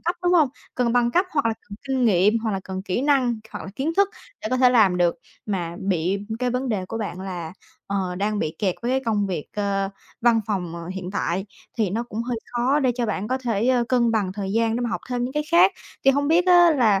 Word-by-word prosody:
cấp, 345 +2 -1
đúng 355 0 +2
hông? 315 -6 +5 0.3
Cần 240 -2 +1
bằng 240 -1 +3
cấp 360 +8 +3
hoặc 285 -6 +1
là 225 - +1
cần 200 - -7
kinh 260 -2 +1
nghiệm, 210 +1 +4
hoặc 220 - 0
là 195 - -2
cần 190 0 -5
kỹ 195 +6 -2
năng, 260 -5 +2
hoặc - - -7
là 190 - -7
kiến 310 +5 -1
thức 400 0 +4 0.3
để 215 - -2
có 255 - +2
thể 250 -1 +5
làm 205 -7 +4
được. 175 -1 +2 0.3
Mà 175 -4 -3
bị 190 0 0 0.2
cái 250 0 0
vấn 250 +1 -2
đề 200 -5 -1
của 225 - -5
bạn 195 -4 -4
là, 180 -3 -5 0.3
ờ, 190 -2 -2
đang 205 +3 -1
bị 160 -5 -2
kẹt 190 -4 0
với 240 - -1
cái 265 - +2
công 210 -3 +1
việc, 175 -6 -3
ờ, 195 -1 0 0.3
văn 230 -1 +4
phòng, 180 -5 -2
ờ, 170 0 -7
hiện 185 0 -5
tại, 190 0 -2 0.3
thì 205 -5 +1
nó 225 +4 -1
cũng 220 +3 -3
hơi 245 0 -3 0.2
khó 255 +5 +2
để 255 -2 +2
cho 240 -1 -1
bạn 210 0 -2
có 260 - 0
thể 240 -1 0 0.2
cân 240 -2 +3
bằng 200 -4 0
thời 195 -1 -4
gian 225 0 +1
để - - -2
mà 240 -1 -1
học - - -2
thêm 245 -1 0
những 255 - -4
cái 300 +1 0
khác. 345 +3 +6 0.3
Thì 270 - +7
hông 285 +1 +1
biết 345 +3 +4
á 350 -1 +7
là 225 -9 +3
225 Hz, 260 wpm, -23 LUFS, 195-255 Hz, 0.3 s, Thì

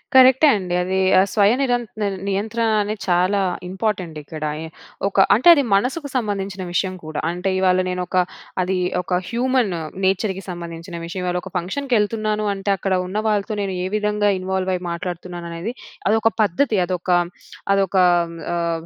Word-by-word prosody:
కరెక్టే 260 +3 +7
అండి 180 -2 -3
అది. 190 +1 0 0.2
ఆ - - +7
స్వయ 205 0 +4
నిరంత 245 -3 0 0.4
నియంత్రణ 215 +4 -1 0.2
అనేది 205 0 -3
చాలా 180 +3 +2 0.3
ఇంపార్టెంట్ 185 -4 -2
ఇక్కడ 155 +1 -8
ఆయే. 160 +2 -6 0.4
ఒక 200 - -5 0.2
అంటే 240 +10 +1
అది 285 -4 +2
మనసుకు 265 +8 -1
సంబంధించిన 200 -5 -2
విషయం 185 +1 0
కూడా. 155 -1 -4
అంటే 180 +2 -2
ఇవాళ 185 -1 +3
నేను 180 0 -2
ఒక 185 - -2 0.4
అది 185 +1 0 0.2
ఒక 180 0 -1
హ్యూమన్ 245 -3 +1 0.3
నేచర్‌కి 190 0 0
సంబంధించిన 170 0 -7
విషయం. 175 +2 -5
ఇవాళ 180 0 0
ఒక 190 - -9
ఫంక్షన్‌కెళ్తున్నాను 215 0 0
అంటే, 195 +1 -4
అక్కడ 190 +1 -1
ఉన్న 190 +3 -4
వాళ్ళతో 210 0 0
నేను 195 -1 -2
ఏ - - -1
విధంగా 210 0 +1
ఇన్వాల్వ్ 190 0 -1
అయ్యి 180 - -5
మాట్లాడుతున్నాను 175 0 -5
అనేది 170 +8 -4 0.4
అదొక 220 +1 +3
పద్ధతి 215 +4 +2
అదొక 180 0 -4 0.6
అదొక 195 -1 +1 0.6
ఆహ్, 170 -1 -1
195 Hz, 155 wpm, -21 LUFS, 180-215 Hz, 0.6 s, కరెక్టే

